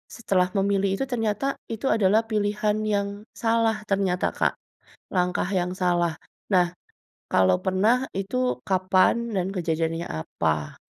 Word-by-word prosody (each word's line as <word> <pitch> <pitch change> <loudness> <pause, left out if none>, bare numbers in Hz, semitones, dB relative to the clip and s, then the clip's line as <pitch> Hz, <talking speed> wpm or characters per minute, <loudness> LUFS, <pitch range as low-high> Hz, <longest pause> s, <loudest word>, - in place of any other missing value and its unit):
Setelah 190 -6 +1
memilih 195 0 +2
itu 270 - -2
ternyata 225 0 -1 0.3
itu 225 +3 -4
adalah 215 +1 +4
pilihan 210 0 +1
yang 200 -1 +1 0.3
salah 225 -1 +2
ternyata 190 -2 +1
Kak, - - +1 0.6
langkah 180 0 +1
yang 180 0 -1
salah, 175 -2 +2 0.4
nah, 180 -1 +5 0.6
kalau 95 -1 +4
pernah 215 +8 +2
itu 195 -8 -2 0.3
kapan 185 0 +3 0.2
dan 185 -1 0
kejadiannya 165 -1 -1 0.2
apa? 75 -2 -2
190 Hz, 120 wpm, -25 LUFS, 180-210 Hz, 0.6 s, nah